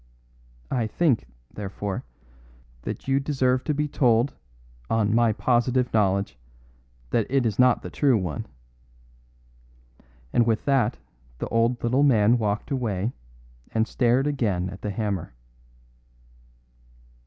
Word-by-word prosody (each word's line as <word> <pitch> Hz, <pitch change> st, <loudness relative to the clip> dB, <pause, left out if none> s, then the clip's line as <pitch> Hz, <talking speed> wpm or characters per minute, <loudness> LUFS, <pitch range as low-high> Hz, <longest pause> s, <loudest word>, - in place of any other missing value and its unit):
I 120 Hz, -3 st, 0 dB
think, 130 Hz, -, +1 dB, 0.3 s
therefore, 100 Hz, -1 st, -4 dB, 0.8 s
that -, -, -6 dB
you 135 Hz, 0 st, +3 dB
deserve 130 Hz, -3 st, +1 dB
to 150 Hz, -, +1 dB
be 150 Hz, +1 st, 0 dB
told, 125 Hz, -2 st, +2 dB, 0.6 s
on 110 Hz, -2 st, +1 dB
my 115 Hz, -1 st, +4 dB
positive 125 Hz, +2 st, +1 dB
knowledge, 100 Hz, -, +1 dB, 0.7 s
that 115 Hz, -, +1 dB
it 135 Hz, -1 st, +2 dB
is 110 Hz, -1 st, -1 dB
not 125 Hz, -1 st, +4 dB
the -, -, -7 dB
true 135 Hz, -5 st, +3 dB
one." 90 Hz, -7 st, -4 dB, 1.9 s
And 120 Hz, -1 st, +3 dB
with 110 Hz, -1 st, 0 dB
that 135 Hz, -6 st, +2 dB, 0.4 s
the -, -, -4 dB
old 115 Hz, +1 st, +1 dB
little 125 Hz, +4 st, +2 dB
man 120 Hz, -4 st, +4 dB
walked 105 Hz, +2 st, -2 dB
away 115 Hz, -4 st, -1 dB, 0.6 s
and 110 Hz, 0 st, +2 dB
stared 125 Hz, +3 st, +2 dB
again 105 Hz, -11 st, -1 dB
at 95 Hz, -, -10 dB
the 105 Hz, -, -3 dB
hammer. 100 Hz, -, -3 dB
115 Hz, 120 wpm, -25 LUFS, 105-130 Hz, 1.9 s, my